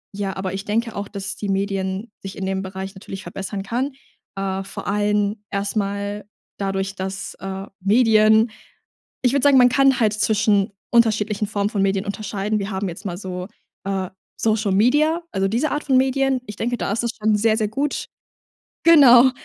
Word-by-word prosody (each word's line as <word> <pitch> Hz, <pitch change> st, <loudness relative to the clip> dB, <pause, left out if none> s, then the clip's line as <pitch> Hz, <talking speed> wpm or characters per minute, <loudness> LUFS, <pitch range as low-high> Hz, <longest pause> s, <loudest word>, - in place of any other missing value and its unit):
ja 195 Hz, -1 st, -3 dB
aber 190 Hz, -1 st, -3 dB
ich 195 Hz, 0 st, -4 dB
denke 225 Hz, +2 st, -1 dB
auch, 200 Hz, 0 st, -4 dB
dass 200 Hz, -1 st, -5 dB
die 205 Hz, -, -5 dB
Medien 195 Hz, +2 st, -2 dB
sich 195 Hz, 0 st, -8 dB
in 195 Hz, -, -3 dB
dem 190 Hz, 0 st, -1 dB
Bereich 190 Hz, +1 st, -6 dB
natürlich 190 Hz, 0 st, -9 dB
verbessern 195 Hz, 0 st, -5 dB
kann, 250 Hz, +7 st, -2 dB, 0.4 s
äh, 195 Hz, 0 st, -2 dB
vor -, -, -8 dB
allem 205 Hz, +1 st, +1 dB
erstmal 200 Hz, 0 st, -2 dB, 0.3 s
dadurch, 195 Hz, -1 st, -2 dB
dass, 190 Hz, 0 st, -5 dB
äh, 195 Hz, 0 st, -5 dB
Medien 220 Hz, +1 st, +4 dB, 0.7 s
ich 250 Hz, -, +5 dB
würde 280 Hz, -1 st, +1 dB
sagen, 285 Hz, -2 st, +6 dB
man 250 Hz, -1 st, +7 dB
kann 270 Hz, 0 st, +4 dB
halt 215 Hz, -2 st, +4 dB
zwischen 210 Hz, -1 st, +2 dB, 0.2 s
unterschiedlichen 215 Hz, -3 st, +2 dB
Formen 205 Hz, -1 st, -1 dB
von 205 Hz, -3 st, -1 dB
Medien 195 Hz, 0 st, +1 dB
unterscheiden. 205 Hz, +1 st, -2 dB
Wir 200 Hz, +1 st, -4 dB
haben 190 Hz, 0 st, -2 dB
jetzt 175 Hz, +5 st, -9 dB
mal 175 Hz, -2 st, -3 dB
so, 180 Hz, -2 st, -6 dB, 0.4 s
äh, 190 Hz, -2 st, -2 dB, 0.3 s
Social 215 Hz, -2 st, +1 dB
Media, 300 Hz, -, +3 dB
also, 195 Hz, -1 st, 0 dB
diese 245 Hz, +8 st, 0 dB
Art 295 Hz, -, -2 dB
von 270 Hz, -, +2 dB
Medien. 265 Hz, 0 st, +2 dB
Ich 210 Hz, -, -7 dB
denke, 245 Hz, +2 st, -1 dB
da 175 Hz, -2 st, -2 dB
ist 225 Hz, +3 st, -1 dB
das 235 Hz, -, 0 dB
schon 215 Hz, 0 st, +2 dB
sehr, 220 Hz, +1 st, +3 dB
sehr 215 Hz, -2 st, 0 dB
gut. 275 Hz, +6 st, -2 dB, 0.8 s
Genau, 265 Hz, -6 st, +8 dB
205 Hz, 180 wpm, -22 LUFS, 195-230 Hz, 0.8 s, Genau